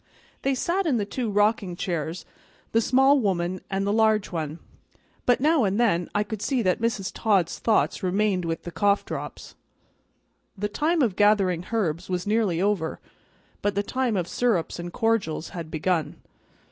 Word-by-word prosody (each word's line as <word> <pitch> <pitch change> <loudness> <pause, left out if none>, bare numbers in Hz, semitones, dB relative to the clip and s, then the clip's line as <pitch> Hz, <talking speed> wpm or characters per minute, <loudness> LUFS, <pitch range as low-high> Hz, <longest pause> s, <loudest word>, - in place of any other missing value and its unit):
They 275 0 +1
sat 350 +7 0
in 270 -6 +2
the 205 - -1
two 235 +3 -3
rocking 205 -2 +1
chairs, 170 -1 -3 0.5
the 225 - +3
small 270 +4 +4
woman 185 -4 -1
and 195 0 -1
the 200 - +1
large 220 -2 +2
one, 160 -2 -3 0.7
but 245 - +4
now 305 0 +3
and 200 +1 +1
then 180 -8 +2
I 205 - +3
could 210 -1 -6
see 240 +2 0
that 185 +2 +1
Mrs. 215 -4 -1
Todd's 195 -6 +1
thoughts 220 -2 +1
remained 190 0 +1
with 165 -1 -3
the 175 - -6
cough 200 +2 +2
drops. - - -7 1.0
The 210 +2 -2
time 310 +7 +1
of 215 -7 0
gathering 195 -4 +3
herbs 180 -7 -1
was 180 -1 -2
nearly 210 -5 +1
over, 190 -4 0 0.6
but 205 -1 0
the 200 - +1
time 250 -1 -1
of 175 -2 -1
syrups 215 -9 0
and 175 0 -5
cordials 225 -8 0
had 170 -3 -7
begun. 160 -1 -1
205 Hz, 170 wpm, -25 LUFS, 175-225 Hz, 1.0 s, small